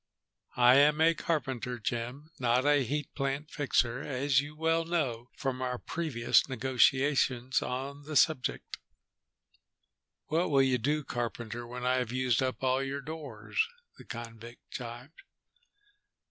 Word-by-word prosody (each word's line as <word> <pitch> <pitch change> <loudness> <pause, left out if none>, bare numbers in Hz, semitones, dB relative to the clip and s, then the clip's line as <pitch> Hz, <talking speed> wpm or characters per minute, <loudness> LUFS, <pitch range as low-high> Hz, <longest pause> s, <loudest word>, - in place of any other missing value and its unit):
"I 125 +1 +7
am 150 +2 +5
a 165 +1 +5
carpenter, 130 -7 -2
Jim, 120 +7 -4
not 125 +1 +2
a 145 -1 +4
heat 145 +5 -3
plant 140 +2 -3
fixer, 130 -4 +1
as 135 0 +1
you 145 +1 -9
well 165 +1 +1
know 135 -9 -2
from 130 -2 -2
our 125 -1 -1
previous 140 -6 +1
negotiations 130 0 +2
on 135 +3 -4
the 155 0 -6
subject." 140 -2 +1 1.5
"What 165 +4 0
will 135 -2 +4
you 130 -2 +2
do, 150 +6 0
carpenter, 120 -1 -4
when 125 +1 -6
I 130 0 +3
have 125 -3 -2
used 130 -2 +1
up 130 0 -2
all 130 +1 +2
your 135 +1 -3
doors?" 135 -9 -3 0.4
the - - -11
convict 115 0 -10
jibed. 120 +4 -8
130 Hz, 135 wpm, -30 LUFS, 120-145 Hz, 1.5 s, I